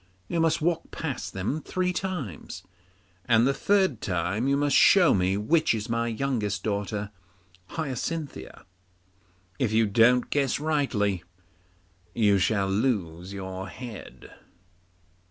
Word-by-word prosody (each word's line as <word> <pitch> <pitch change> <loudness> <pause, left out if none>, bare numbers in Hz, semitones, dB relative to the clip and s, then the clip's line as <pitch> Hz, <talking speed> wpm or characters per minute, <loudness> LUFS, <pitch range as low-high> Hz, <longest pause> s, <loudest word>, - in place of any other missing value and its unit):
You 170 - -1
must 165 0 +2
walk 170 0 0
past 130 -11 -5
them 100 +11 -2
three 180 +2 -1
times, 160 - -5 0.6
and 115 -1 +4
the 135 - +3
third 190 - +1
time 95 +6 -1
you 140 0 +2
must 145 0 +1
show 185 -4 +6
me 95 +1 +1
which 155 +6 +2
is 110 +2 -5
my 115 0 0
youngest 110 -5 -2
daughter 100 0 -2 0.6
Hyacinthia. 155 0 -5 0.9
If 120 -5 +1
you 110 +1 +3
don't 120 +4 +3
guess 140 -3 +1
rightly, 135 - 0 0.9
you 105 -3 +3
shall 100 0 +1
lose 95 -5 -1
your 95 -1 -6
head. 120 0 -10
115 Hz, 120 wpm, -26 LUFS, 100-145 Hz, 0.9 s, show